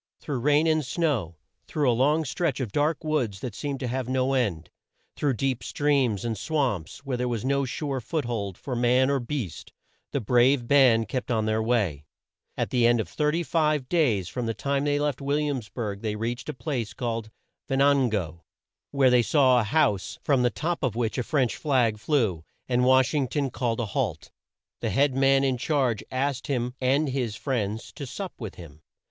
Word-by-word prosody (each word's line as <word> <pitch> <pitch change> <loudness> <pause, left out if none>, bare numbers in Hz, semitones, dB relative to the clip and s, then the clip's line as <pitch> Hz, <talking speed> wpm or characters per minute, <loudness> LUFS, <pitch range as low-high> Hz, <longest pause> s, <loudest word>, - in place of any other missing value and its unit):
Through 140 -4 -3
rain 150 +5 +3
and 155 -1 +2
snow, 130 - -1 0.3
through 150 -3 0
a 125 - +4
long 150 +6 +2
stretch 135 +1 -1
of 120 -6 -3
dark 150 +5 0
woods 130 -11 -1
that 125 -5 -5
seemed 140 +3 -4
to 130 - -2
have 125 0 -3
no 130 +1 +1
end, 100 -12 -1 0.4
through 140 -4 0
deep 130 0 -1
streams 135 -8 +1
and 115 -1 -1
swamps 130 - -2
where 130 -2 -2
there 125 0 -1
was 120 -1 -2
no 140 0 +1
sure 135 +1 -3
foot 155 +3 -2
hold 100 -6 -3
for 130 - -5
man 125 +3 +3
or 140 - +1
beast, 120 - -5 0.4
the 140 - 0
brave 125 +2 +3
band 125 -5 +5
kept 125 +3 -3
on 110 -3 +1
their 110 0 +1
way. 100 - 0 0.5
At - - -1
the 120 -2 +4
end 120 0 +3
of 110 - -2
35 150 - 0
days 120 - +2
from 120 +4 -4
the 115 - -2
time 140 +4 -1
they 145 0 +2
left 145 -2 -1
Will 140 +1 0
iams 140 -7 -2
burg 105 -5 -4
they 110 -2 -2
reached 120 +6 -4
a - - -2
place 120 -2 -3
called 115 -3 -3 0.4
Ven 135 -1 0
an 140 -2 +4
go, 85 -6 -3 0.5
where 135 -2 +3
they 125 -1 +5
saw 130 -1 +4
a - - +1
house 105 -5 +1
from 140 -3 +2
the 125 - +3
top 165 +8 -3
of 125 -5 -1
which 115 +1 -1
a - - 0
French 130 -3 0
flag 125 -8 +1
flew, 110 - 0 0.2
and 125 0 +2
Wash 130 +1 +4
ing 140 -3 +1
ton 140 0 -1
called 115 0 -1
a 120 - 0
halt. 100 - -3 0.5
The - - -2
head 140 0 +2
man 135 +1 +3
in 130 -2 0
charge 130 -6 0
asked 130 0 -2
him 125 -3 -1
and 135 +4 +2
his 125 -5 -2
friends 110 -4 -3
to 140 - -7
sup 190 +8 -6
with 110 -5 -6
him. 80 -3 -12
130 Hz, 200 wpm, -26 LUFS, 115-140 Hz, 0.5 s, band